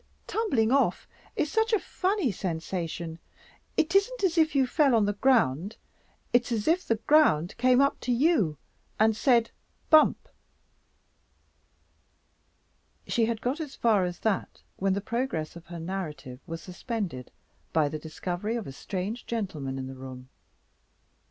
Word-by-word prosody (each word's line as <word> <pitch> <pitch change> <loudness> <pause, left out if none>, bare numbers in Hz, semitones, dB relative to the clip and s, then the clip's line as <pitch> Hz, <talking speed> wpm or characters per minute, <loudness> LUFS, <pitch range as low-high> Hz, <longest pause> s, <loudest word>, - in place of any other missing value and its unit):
"Tumbling 265 - +1
off 275 +1 +2 0.3
is 310 -1 -1
such 445 +3 +1
a 435 - +4
funny 375 - 0
sensation. 170 -2 -4 0.6
It 315 +2 +2
isn't 485 +4 +2
as 355 -3 +2
if 320 -3 +3
you 270 -1 +4
fell 275 -1 +3
on 220 -2 +4
the 205 - 0
ground; 205 - +2 0.6
it's 245 0 +3
as 220 -3 -1
if 345 +3 +3
the 230 - +3
ground 215 - +3
came 255 +1 +4
up 280 0 +2
to 250 - -2
you 240 - +2 0.4
and 220 0 +4
said 235 0 +3 0.4
Bump!" 310 -1 +5 2.8
She 230 - +1
had 225 -1 -2
got 260 +6 -1
as 300 -4 -6
far 215 -5 +3
as 175 -1 -3
that, 215 -4 -2
when 195 0 +1
the 200 - -1
progress 235 -9 -3
of 170 0 -12
her 170 -1 -7
narrative 155 -8 -5
was 165 -1 -6
suspended 180 - -5 0.4
by 155 -2 +3
the 155 +1 -4
discovery 175 +7 -4
of 230 -4 -3
a - - -7
strange 195 - -5
gentleman 155 - -3
in 130 - -4
the 135 - -7
room. 130 -1 -10
220 Hz, 150 wpm, -28 LUFS, 165-270 Hz, 2.8 s, Bump